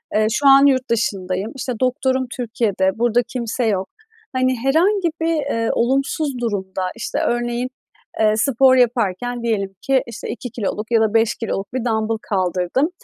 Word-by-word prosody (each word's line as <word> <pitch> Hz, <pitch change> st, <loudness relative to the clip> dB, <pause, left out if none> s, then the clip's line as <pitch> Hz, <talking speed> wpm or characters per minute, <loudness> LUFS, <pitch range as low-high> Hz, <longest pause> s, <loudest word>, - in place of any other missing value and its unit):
Eee, 215 Hz, 0 st, +3 dB
şu 280 Hz, +4 st, +2 dB
an 275 Hz, +1 st, +8 dB
yurt 260 Hz, -2 st, +2 dB
dışındayım. 195 Hz, -3 st, -1 dB
İşte, 255 Hz, -1 st, -3 dB
doktorum 260 Hz, 0 st, +1 dB
Türkiye'de, 220 Hz, -5 st, -1 dB
burada 240 Hz, 0 st, +2 dB
kimse 240 Hz, 0 st, -3 dB
yok. 195 Hz, -3 st, 0 dB, 0.4 s
Hani, 255 Hz, 0 st, +1 dB
herhangi 340 Hz, -, +2 dB
bir, 330 Hz, 0 st, +1 dB
eee, 275 Hz, -7 st, -1 dB
olumsuz 270 Hz, +2 st, 0 dB
durumda, 195 Hz, -5 st, -3 dB
işte, 230 Hz, -, -3 dB
örneğin, 240 Hz, +1 st, -1 dB, 0.5 s
eee, 215 Hz, -1 st, +4 dB
spor 260 Hz, +1 st, +4 dB
yaparken 245 Hz, -1 st, 0 dB
diyelim 200 Hz, -4 st, -1 dB
ki, 270 Hz, -1 st, +2 dB
işte, 235 Hz, -1 st, -7 dB
2 245 Hz, 0 st, -5 dB
kiloluk 215 Hz, 0 st, -4 dB
ya 230 Hz, -1 st, +4 dB
da 220 Hz, -1 st, +1 dB
5 225 Hz, 0 st, +3 dB
kiloluk 200 Hz, -2 st, -4 dB
bir 255 Hz, -2 st, -2 dB
dambıl 220 Hz, -1 st, 0 dB
kaldırdım 185 Hz, -, 0 dB
235 Hz, 155 wpm, -20 LUFS, 215-260 Hz, 0.5 s, an